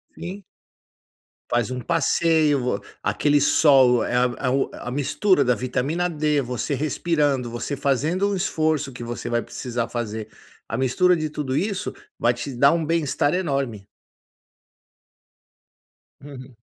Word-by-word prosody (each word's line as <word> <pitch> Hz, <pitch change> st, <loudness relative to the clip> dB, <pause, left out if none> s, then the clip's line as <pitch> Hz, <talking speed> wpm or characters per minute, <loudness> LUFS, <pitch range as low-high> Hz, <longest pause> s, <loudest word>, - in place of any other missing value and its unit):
Sim. 195 Hz, +3 st, -7 dB, 1.1 s
Faz 120 Hz, -2 st, +1 dB
um 125 Hz, -1 st, -4 dB
passeio, 160 Hz, -2 st, +2 dB
vo 125 Hz, -5 st, -1 dB, 0.2 s
aquele 145 Hz, -1 st, +2 dB
sol, 135 Hz, -4 st, +5 dB
eh, -, -, -2 dB, 0.3 s
o 135 Hz, +2 st, +1 dB
a -, -, -7 dB
mistura 145 Hz, +9 st, +2 dB
da 125 Hz, -, +3 dB
vitamina 140 Hz, +9 st, -1 dB
D, 150 Hz, -2 st, +1 dB
você 125 Hz, +2 st, -3 dB
respirando, 145 Hz, -3 st, 0 dB
você 120 Hz, +5 st, -4 dB
fazendo 150 Hz, +8 st, 0 dB
um -, -, 0 dB
esforço 155 Hz, -6 st, 0 dB
que 120 Hz, -, -8 dB
você 120 Hz, 0 st, -5 dB
vai 120 Hz, 0 st, +1 dB
precisar 120 Hz, -2 st, -4 dB
fazer, 110 Hz, -2 st, -4 dB, 0.4 s
a 115 Hz, -, -3 dB
mistura 135 Hz, +8 st, +3 dB
de 155 Hz, -2 st, -2 dB
tudo 145 Hz, -3 st, -3 dB
isso 200 Hz, +1 st, -2 dB, 0.2 s
vai 120 Hz, -, +2 dB
te 120 Hz, +3 st, -6 dB
dar 140 Hz, +4 st, +5 dB
um 165 Hz, -1 st, 0 dB
bem-estar 155 Hz, -2 st, +1 dB
enorme. 135 Hz, -, -2 dB, 2.4 s
Uhum. 130 Hz, -3 st, -11 dB
140 Hz, 135 wpm, -23 LUFS, 125-160 Hz, 2.4 s, sol